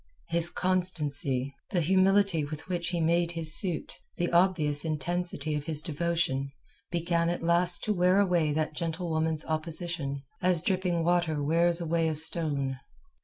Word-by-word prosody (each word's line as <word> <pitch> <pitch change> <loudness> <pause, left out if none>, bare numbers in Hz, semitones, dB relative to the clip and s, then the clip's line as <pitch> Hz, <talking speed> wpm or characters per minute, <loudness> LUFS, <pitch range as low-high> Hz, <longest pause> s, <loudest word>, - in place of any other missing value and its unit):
His 170 0 +4
constancy, 150 -8 0 0.2
the 185 - -1
humility 190 0 +2
with 150 +1 -8
which 175 -2 -3
he 175 -1 -2
made 170 +1 +1
his 160 -2 +1
suit, 180 -5 -2 0.2
the 175 - -2
obvious 170 -5 +2
intensity 160 0 -3
of 150 -1 -4
his 155 -2 0
devotion, 155 -4 -1 0.4
began 170 -1 -1
at 175 -1 -4
last 170 +1 +4
to 215 - 0
wear 180 +1 +2
away 175 -6 +1
that 155 +1 -2
gentlewoman's 160 -1 -2
opposition, 155 -3 -3 0.2
as 180 -3 +2
dripping 180 -3 -1
water 170 -3 0
wears 170 +3 +2
away 165 -1 -1
a 160 - -2
stone. 145 -4 +4
170 Hz, 145 wpm, -28 LUFS, 155-175 Hz, 0.4 s, His